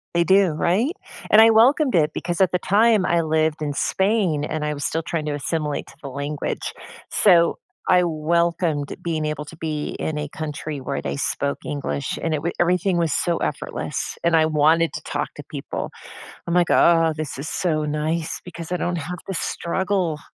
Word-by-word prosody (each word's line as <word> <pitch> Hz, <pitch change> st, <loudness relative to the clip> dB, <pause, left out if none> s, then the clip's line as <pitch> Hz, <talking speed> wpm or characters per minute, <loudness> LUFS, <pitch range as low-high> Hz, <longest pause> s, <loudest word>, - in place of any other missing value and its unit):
They 170 Hz, -, +4 dB
do, 190 Hz, +1 st, +4 dB
right? 190 Hz, -, +1 dB, 0.4 s
And 215 Hz, -, +8 dB
I 225 Hz, -, +8 dB
welcomed 255 Hz, +5 st, +4 dB
it 155 Hz, -3 st, +3 dB
because 175 Hz, +1 st, -2 dB
at 190 Hz, -, +4 dB
the 180 Hz, -, +1 dB
time, 210 Hz, +1 st, +3 dB
I 170 Hz, -1 st, +2 dB
lived 160 Hz, -1 st, 0 dB
in 145 Hz, -1 st, -2 dB
Spain, 190 Hz, -2 st, +1 dB
and 155 Hz, 0 st, -3 dB
I 150 Hz, -, -1 dB
was 145 Hz, -1 st, -4 dB
still 165 Hz, +1 st, -1 dB
trying 155 Hz, 0 st, -3 dB
to 150 Hz, -, -2 dB
assimilate 150 Hz, +1 st, -2 dB
to -, -, -15 dB
the 140 Hz, -, -6 dB
language. 140 Hz, +2 st, -4 dB, 0.4 s
So, 170 Hz, -4 st, +4 dB, 0.3 s
I 180 Hz, -1 st, +5 dB
welcomed 165 Hz, -2 st, 0 dB
being 160 Hz, -2 st, -2 dB
able 150 Hz, -1 st, -3 dB
to 160 Hz, -, -11 dB
be 155 Hz, -2 st, -4 dB
in 155 Hz, -, -3 dB
a 150 Hz, 0 st, -3 dB
country 150 Hz, -1 st, -5 dB
where 140 Hz, +1 st, -3 dB
they -, -, -3 dB
spoke 140 Hz, 0 st, -1 dB
English, 145 Hz, -1 st, -3 dB
and 165 Hz, -, -1 dB
it 150 Hz, -, -1 dB
wa 170 Hz, -, -1 dB
everything 180 Hz, +1 st, +2 dB
was 165 Hz, -4 st, +1 dB
so 170 Hz, -1 st, +1 dB
effortless, -, -, -3 dB
and 170 Hz, -1 st, +4 dB
I 160 Hz, -1 st, +5 dB
wanted 160 Hz, +2 st, +3 dB
to -, -, -5 dB
talk -, -, -3 dB
to -, -, -8 dB
people. -, -, -5 dB, 0.6 s
I'm 170 Hz, -, -1 dB
like, 175 Hz, -1 st, +3 dB
"Oh, 165 Hz, -1 st, +5 dB
this 155 Hz, -3 st, -4 dB
is 145 Hz, -, -5 dB
so 155 Hz, -5 st, 0 dB
nice 155 Hz, +2 st, -2 dB
because 170 Hz, -1 st, -8 dB
I 180 Hz, -, 0 dB
don't 175 Hz, 0 st, -1 dB
have 175 Hz, +3 st, -5 dB
to 195 Hz, -, -3 dB
struggle." 175 Hz, 0 st, -1 dB
165 Hz, 195 wpm, -22 LUFS, 150-180 Hz, 0.6 s, And